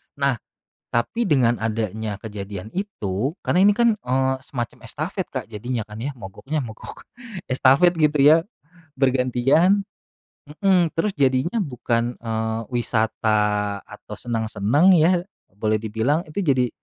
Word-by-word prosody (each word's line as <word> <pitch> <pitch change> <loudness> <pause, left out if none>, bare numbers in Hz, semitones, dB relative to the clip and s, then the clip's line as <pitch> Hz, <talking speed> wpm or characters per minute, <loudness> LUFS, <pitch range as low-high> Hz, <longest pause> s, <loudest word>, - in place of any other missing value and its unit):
Nah, 140 -3 +1 0.5
tapi 195 - -1
dengan 120 -6 +3
adanya 110 -1 -2
kejadian 105 -1 -7
itu, 140 - -3
karena 180 - +2
ini 205 +1 +5
kan, 235 -3 +3
eee, 130 +1 0
semacam 120 -4 -5
estafet 170 - -4
Kak, 130 -4 -4
jadinya 115 +1 -3
kan 105 +1 -10
ya, 140 +2 -4
mogoknya 130 +9 -5
mogok 110 -1 -10 0.5
estafet 135 +7 +5
gitu 150 0 +3
ya. 160 +4 +6 0.5
Bergantian 135 - +3 0.6
mhm, 175 +2 +1
terus 195 +4 -1
jadinya 135 - +1
bukan, 120 -3 -2
eee, 110 0 -2
wisata, 110 -3 0
atau - - -10
seneng-seneng 115 - +2
ya, 175 +2 +3 0.3
boleh 110 0 0
dibilang. 110 +8 0
Itu 190 +6 -3
jadi, 130 -5 +2
125 Hz, 125 wpm, -22 LUFS, 110-155 Hz, 0.6 s, ya